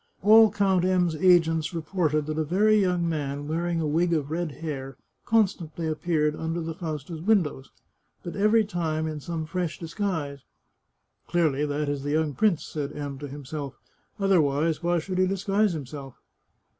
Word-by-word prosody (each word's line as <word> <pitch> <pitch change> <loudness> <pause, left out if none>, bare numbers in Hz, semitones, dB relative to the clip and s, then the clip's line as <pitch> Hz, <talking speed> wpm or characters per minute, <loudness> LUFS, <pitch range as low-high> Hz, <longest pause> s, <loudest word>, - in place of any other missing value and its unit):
All 220 +1 +8
Count 195 -3 +2
M 180 -2 +2
's - - -5
agents 165 -2 +3
reported 155 -2 0
that 155 +1 -3
a - - +2
very 210 +7 +3
young 180 -2 +1
man, 145 -3 -3
wearing 170 +2 -1
a 160 - -1
wig 170 +3 +1
of 150 -2 -1
red 170 -1 -2
hair, 135 -5 -6 0.3
constantly 185 -7 +1
appeared 155 -1 0
under 160 +2 -3
the 165 0 -4
Fausta's 160 -2 -6
windows, 170 -9 +1 0.5
but 175 - -6
every 215 +2 +3
time 160 -5 -2
in 155 -1 -4
some 160 +1 -4
fresh 170 0 -3
dis 165 -1 -8
guise. 160 -9 -2 0.5
" - - -49
Clearly 150 -4 +1
that 145 +1 -2
is 145 -1 -2
the 145 +1 -2
young 155 -1 +1
prince," 205 -2 +2
said 145 -2 -4
M 140 -2 -5
to 145 - -6
himself; 140 0 -6 0.2
" - - -41
otherwise 160 -5 +2
why 175 0 +1
should 185 +3 -3
he 185 - +4
disguise 195 +1 +1
himself 140 -3 -7
160 Hz, 175 wpm, -26 LUFS, 150-180 Hz, 0.5 s, All